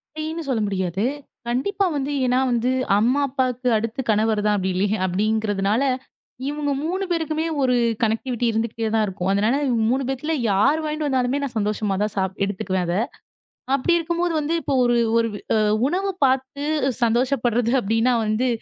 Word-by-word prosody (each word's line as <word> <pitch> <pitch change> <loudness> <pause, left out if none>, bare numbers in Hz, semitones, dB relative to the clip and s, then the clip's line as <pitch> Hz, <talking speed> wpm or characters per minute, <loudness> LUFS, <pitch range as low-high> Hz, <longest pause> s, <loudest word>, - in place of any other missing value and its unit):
அப்படீன்னு 315 +2 -4
சொல்ல 240 -4 +1
முடியாது. 190 -1 -2 0.4
கண்டிப்பா 385 +12 0
வந்து 280 0 -2
ஏன்னா 250 +1 +2
வந்து 240 +1 +1 0.3
அம்மா 245 +6 +2
அப்பாவுக்கு 255 -2 -1
அடுத்து 230 +4 -3
கணவர் 215 0 +2
தான் 210 0 +3
அப்படீ 190 -1 -1
இல்லயா 205 +3 +1
அப்படிங்கிறதுனால 205 +2 0 0.7
இவங்க 295 0 -2
3 365 +5 -1
பேருக்குமே 320 -1 -1 0.2
ஒரு 255 -2 +3 0.3
கனக்டிவிட்டி 235 +2 0
இருந்துக்கிட்டே 225 0 -2
தான் 220 - +3
இருக்கும். 190 -2 -3
அதனால 215 +5 +2 0.3
3 265 +3 +1
பேத்துல 270 +4 -2 0.2
யார் 265 +11 +3
வாங்கிட்டு 305 0 -2
வந்தாலுமே 260 0 +1
நான் 270 -4 -4
சந்தோஷமா 210 -1 0
தான் 210 0 -2
சாப் 190 -1 -1
எடுத்துக்குவேன் 190 -2 -1
அத. 170 - 0 0.8
அப்படி 275 +6 +1
இருக்கும்போது 340 +1 -1
வந்து 300 +3 -1
இப்போ 280 - -1
ஒரு 240 0 +3 0.2
ஒரு 230 0 +2 0.3
அ - - +3 0.3
உணவு 385 +5 -1
பாத்து 265 +2 0 0.4
சந்தோஷப்படுறது 240 0 +1
அப்படின்னா 225 +4 +1
வந்து 215 +4 +1
240 Hz, 150 wpm, -22 LUFS, 215-280 Hz, 0.8 s, தான்